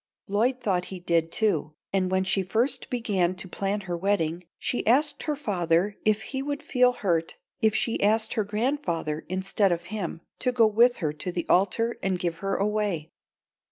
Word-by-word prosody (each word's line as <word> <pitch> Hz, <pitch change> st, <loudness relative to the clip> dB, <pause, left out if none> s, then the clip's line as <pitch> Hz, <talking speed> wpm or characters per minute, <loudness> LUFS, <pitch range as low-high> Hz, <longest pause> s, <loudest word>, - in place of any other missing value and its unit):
Lloyd 230 Hz, +6 st, +1 dB
thought 185 Hz, -7 st, 0 dB
he 190 Hz, -, -7 dB
did, 165 Hz, -2 st, +1 dB
too, 155 Hz, -9 st, +1 dB, 0.2 s
and 185 Hz, -1 st, +1 dB
when 190 Hz, 0 st, +2 dB
she 190 Hz, +1 st, +1 dB
first 240 Hz, +7 st, 0 dB
began 195 Hz, -7 st, 0 dB
to 185 Hz, +1 st, -5 dB
plan 200 Hz, +3 st, -2 dB
her 180 Hz, -3 st, -4 dB
wedding 170 Hz, -2 st, 0 dB
she 245 Hz, -, -2 dB
asked 285 Hz, +5 st, +3 dB
her 300 Hz, -, -1 dB
father 190 Hz, -, 0 dB
if 215 Hz, 0 st, +2 dB
he 265 Hz, +2 st, -4 dB
would 285 Hz, +2 st, -3 dB
feel 250 Hz, -5 st, +3 dB
hurt 170 Hz, -7 st, -1 dB, 0.3 s
if 220 Hz, -1 st, +3 dB
she 230 Hz, +2 st, 0 dB
asked 220 Hz, +2 st, +3 dB
her 220 Hz, -, +1 dB
grandfather 205 Hz, -, -2 dB
instead 190 Hz, +1 st, +1 dB
of 170 Hz, 0 st, -1 dB
him 175 Hz, -5 st, -4 dB, 0.2 s
to 250 Hz, -, +1 dB
go 240 Hz, -2 st, +4 dB
with 235 Hz, +3 st, +4 dB
her 150 Hz, -, 0 dB
to 155 Hz, +4 st, -5 dB
the 175 Hz, -1 st, -3 dB
altar 215 Hz, +5 st, +2 dB
and 190 Hz, -1 st, 0 dB
give 170 Hz, -2 st, -2 dB
her 195 Hz, +2 st, -2 dB
away. 200 Hz, -6 st, -1 dB
200 Hz, 185 wpm, -26 LUFS, 175-230 Hz, 0.3 s, go